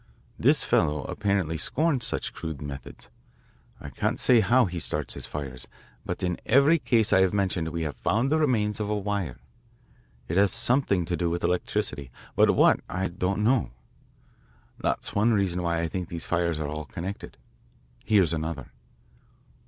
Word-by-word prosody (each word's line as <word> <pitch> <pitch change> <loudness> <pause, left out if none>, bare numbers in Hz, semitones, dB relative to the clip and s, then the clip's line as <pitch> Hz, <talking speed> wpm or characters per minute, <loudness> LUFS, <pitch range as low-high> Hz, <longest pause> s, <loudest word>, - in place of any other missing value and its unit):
This - - +4
fellow 75 -1 +1
apparently 100 -6 -1
scorns 145 -6 +1
such - - -2
crude 80 -4 -6
methods. 70 -3 -9 0.7
I - - -8
can't - - -1
say 125 -2 +5
how 120 +4 +4
he 90 -2 -4
starts - - -3
his - - -7
fires, 65 -3 -6 0.4
but - - -4
in 90 -1 -1
every 140 +7 +4
case 115 -6 +2
I 95 - +6
have 95 +1 +2
mentioned 95 -4 0
we 80 0 -3
have 75 -2 -4
found 120 +6 0
the 155 - +3
remains 110 -8 +1
of 105 -1 -2
a 105 - 0
wire. 100 -9 -3 0.9
It 85 - -2
has 100 0 +4
something 120 -9 +2
to 85 - -1
do 85 -1 -1
with 85 +1 -3
electricity 70 -6 -1 0.3
but - - +5
what, - - +5
I 95 +2 -2
don't 95 +3 -1
know. 120 +2 +2 1.1
That's - - -2
one 110 +3 +3
reason 95 -4 0
why 85 -1 0
I 85 - 0
think 90 +1 -5
these 85 -1 -6
fires 85 -2 0
are 75 - -2
all 75 +1 -5
connected. 90 +9 -7 0.7
Here's 100 -6 +3
another." 80 -5 -4
90 Hz, 170 wpm, -26 LUFS, 80-105 Hz, 1.1 s, I